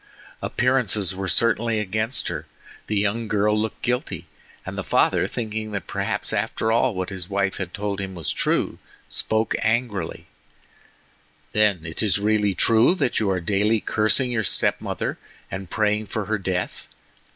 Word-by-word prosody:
Appearances 110 -7 +1
were 95 0 -3
certainly 115 +2 +2
against 110 +5 0
her; - - -4 0.4
the 105 - 0
young 105 +3 0
girl 105 0 +2
looked 110 +1 -2
guilty, 125 +1 -1 0.4
and - - -5
the - - -3
father - - +3
thinking 110 -2 -4
that 100 - -3
perhaps - - -2
after 110 - 0
all 115 0 +3
what 95 +1 -3
his 90 -2 -6
wife 100 -1 0
had 95 -3 -4
told 100 0 -3
him 95 -1 -5
was 85 -3 -1
true, - - 0 0.3
spoke 110 0 0
angrily: 110 -5 -1 1.3
"Then, 105 -6 +2
is 95 +6 0
it 100 - -5
really 105 -2 +2
true 115 - +5
that 125 - +1
you 105 - +1
are 95 -1 +1
daily 105 +5 +2
cursing 110 +5 +2
your 115 -2 0
step - - +2
mother - - -3 0.3
and 95 -1 -5
praying 105 +1 +1
for 105 0 -3
her 110 +1 0
death? 90 -1 -3
105 Hz, 160 wpm, -24 LUFS, 95-110 Hz, 1.3 s, true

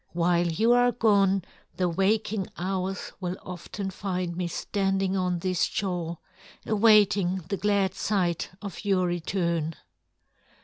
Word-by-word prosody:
While 175 0 +2
you 215 +8 +2
are 245 0 +5
gone, 200 -5 +3 0.3
the 180 - +2
waking 195 +3 0
hours 190 +1 -3
will 180 0 -3
often 185 +2 -6
find 185 -3 -3
me 180 0 -2
standing 195 +1 -1
on 180 -2 0
this 185 0 -1
shore, 175 -4 -3 0.5
awaiting 205 -4 +4
the 200 - -1
glad 200 -1 +1
sight 185 -4 0
of 200 -2 -7
your 195 -3 +2
return." 170 -2 -1
190 Hz, 125 wpm, -27 LUFS, 175-200 Hz, 0.5 s, are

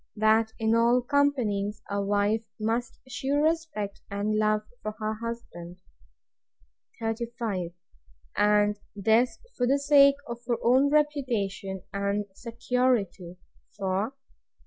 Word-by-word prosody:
That 220 +1 +3
in 220 0 +1
all 235 +2 +4
companies 240 -8 0
a 200 0 -1
wife 205 +2 +1 0.2
must 225 +2 -2
shew 265 +3 -2
respect 300 -10 -1
and 205 +2 -1
love 215 0 +2 0.2
to 215 - -3
her 215 0 -2
husband. 180 -7 -7 1.2
35. 225 -5 -3 0.7
And 210 0 +3 0.2
this 225 +3 +2 0.2
for 245 - +1
the 275 +2 +4
sake 280 -1 +6
of 235 0 -5
her 240 -2 +1
own 260 +4 +4
reputation 235 -11 0
and 200 +1 -1
security; 230 -6 -1 0.4
for, 195 +2 -1
36. - - -43
220 Hz, 115 wpm, -27 LUFS, 205-250 Hz, 1.2 s, sake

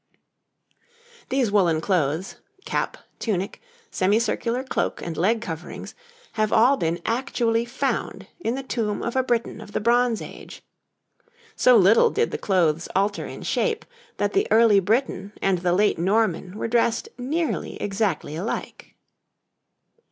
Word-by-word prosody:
These 255 -5 +1
woollen 175 -6 +3
clothes 165 -1 -1 0.3
cap, - - -2 0.2
tunic, 200 -2 -2 0.3
semicircular 230 +5 +1
cloak, 265 - -2
and 170 -1 -5
leg 215 +8 +1
coverings 170 -6 -7 0.4
have 215 -1 0
all 245 +5 +5
been 170 -7 -1
actually 230 -1 0
found 265 +3 -2
in 240 -8 -1
the 270 - -4
tomb 220 -5 -2
of 235 - -3
a 260 - +4
Briton 240 -2 -1
of 205 - -12
the - - 0
Bronze 240 +1 +2
Age. - - -10 0.9
So 250 -2 +6
little 205 +3 +6
did 460 +2 0
the - - -3
clothes 170 -4 +1
alter 200 +2 0
in - - -8
shape, 450 -2 -1 0.3
that - - 0
the 395 +2 +2
early 220 -2 +6
Briton 205 0 -1
and 190 -2 +1
the 175 0 0
late 200 0 +2
Norman 190 0 0
were - - -2
dressed 230 0 +1
nearly 310 +6 -2
exactly 195 -7 -1
alike. 190 +8 -5
215 Hz, 135 wpm, -24 LUFS, 185-240 Hz, 0.9 s, So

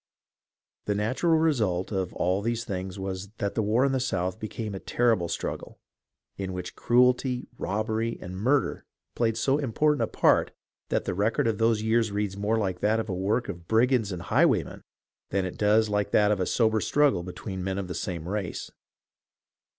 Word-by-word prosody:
The 105 - 0
natural 130 +11 +2
result 110 - +1
of 95 -3 -1
all 95 +3 +1
these 115 +2 -2
things 95 -3 -4
was 95 0 -5
that 100 - -2
the 115 - 0
war 110 +5 +2
in 140 - +2
the 135 - +1
South 95 -8 -1
became 110 0 -5
a 95 - -5
terrible 115 -8 +1
struggle, 85 - -5 0.6
in 95 -1 -4
which 90 -1 -6
cruelty, 125 +1 +2
robbery, 110 +3 -1
and 90 0 -7
murder 130 +9 +1 0.3
played 115 -2 +1
so 135 +5 +2
important 150 +3 +1
a - - +2
part - - +2 0.4
that - - 0
the - - -1
record 110 +9 +1
of 110 -2 0
those 115 -1 +2
years 110 -1 +2
reads 100 -1 -2
more 105 +3 0
like 95 -4 -1
that 110 +3 +2
of 110 - -2
the 100 - -4
work 105 +7 0
of 85 -4 -7
brigands 115 -2 +2
and 90 -2 -5
highwaymen - - +2 0.5
than 95 0 0
it 90 - -5
does 110 +1 +4
like 105 -1 0
that 105 0 +4
of 105 - +1
a 90 - 0
sober 110 -2 +2
struggle 145 -11 +3
between 90 +1 -6
men 95 0 -2
of 100 -2 -3
the 90 - -4
same 85 -3 -4
race. 100 -2 -4
105 Hz, 185 wpm, -27 LUFS, 95-115 Hz, 0.6 s, does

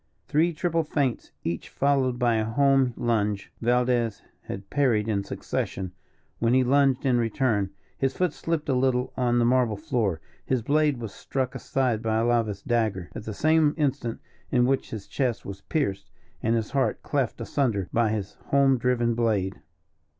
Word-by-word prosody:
Three 165 +4 +3
triple 165 +1 0
feints, 145 -5 -1
each 85 0 -3
followed 135 -3 +1
by 120 -2 +2
a 110 - +1
home 130 +2 +3
lunge, 105 -4 0
Valdez 120 -2 +1 0.2
had 95 0 -7
parried 120 -7 +2
in 100 -3 0
succession, 95 -1 -3 0.5
when 115 +2 +3
he 130 - +5
lunged 135 0 +3
in 125 -2 +3
return. 115 -3 +1 0.3
His 135 -1 0
foot 180 -4 +1
slipped 165 -2 -2
a 135 - +2
little 125 0 +1
on 120 -2 +1
the 120 - +3
marble 125 -3 +2
floor; 120 - -1 0.2
his 130 -3 0
blade 150 +1 +2
was 115 -4 -6
struck 130 -2 -3
aside 125 -5 0
by 110 -1 0
Alava's 115 -3 +1
dagger, 110 -7 0
at - - -7
the 110 - -4
same 155 +1 +3
instant 140 -6 -1 0.3
in 125 -2 +3
which 135 +1 0
his 110 -3 -6
chest 125 -4 -2
was 100 0 -7
pierced 100 - -2 0.3
and 115 +1 +1
his 110 -2 -2
heart 130 -6 0
cleft 135 -6 -1
asunder 115 -5 0
by 115 -1 +3
his 105 -3 -3
home 135 -2 +4
driven 120 -1 +1
blade. 105 -5 0
120 Hz, 165 wpm, -26 LUFS, 110-135 Hz, 0.5 s, he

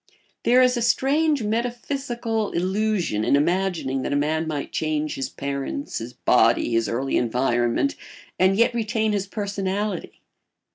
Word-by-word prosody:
There 250 +2 +6
is 250 0 +3
a - - -1
strange 280 +4 +2
metaphysical 235 0 -2
illusion 190 - 0
in 140 - +3
imagining 165 -3 0
that - - -3
a - - +1
man 155 +3 0
might 150 -3 -4
change 155 -1 -1
his 135 -1 -3
parents, 140 - -4
his 120 +2 -7
body, 120 -1 +3
his 115 0 +1
early 130 +4 0
environment, 120 - +1 0.5
and 190 +1 +4
yet 235 +2 +3
retain 220 -1 0
his 200 -1 -1
personality. 200 -1 -3
190 Hz, 140 wpm, -23 LUFS, 140-230 Hz, 0.5 s, There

